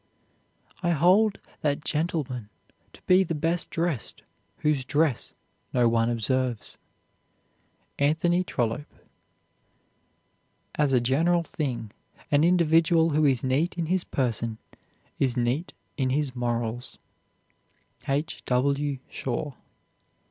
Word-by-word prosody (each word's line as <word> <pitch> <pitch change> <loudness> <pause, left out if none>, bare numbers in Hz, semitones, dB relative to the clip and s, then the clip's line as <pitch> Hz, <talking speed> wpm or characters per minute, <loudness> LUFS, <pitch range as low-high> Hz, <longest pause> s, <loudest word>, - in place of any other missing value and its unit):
I 175 - 0
hold 190 +7 +4 0.2
that 145 0 -1
gentleman 145 -8 -2 0.4
to - - -17
be 185 +1 +5
the 165 -2 -3
best 165 +3 -1
dressed 165 -7 -2 0.3
whose 150 -3 +1
dress 145 -1 0 0.4
no 120 -1 +4
one 115 0 +2
observes. 120 0 -1 1.2
ANTHONY 165 +5 +2
TROLLOPE. 125 +3 -2 1.8
As 150 -2 +1
a 130 - +4
general 165 +8 +2
thing 125 -10 -4 0.4
an 145 +1 +4
individual 165 -1 +4
who 150 +1 +3
is 130 -4 +2
neat 145 +8 0
in 170 - -1
his 185 +2 0
person 115 -3 -2 0.6
is 130 -2 +2
neat 125 +8 0 0.3
in 130 -3 +1
his 135 -1 0
morals. 120 0 -3 1.1
H. 145 +3 -1
W. 140 +2 +1
SHAW. 135 +3 -4
145 Hz, 105 wpm, -26 LUFS, 125-165 Hz, 1.8 s, be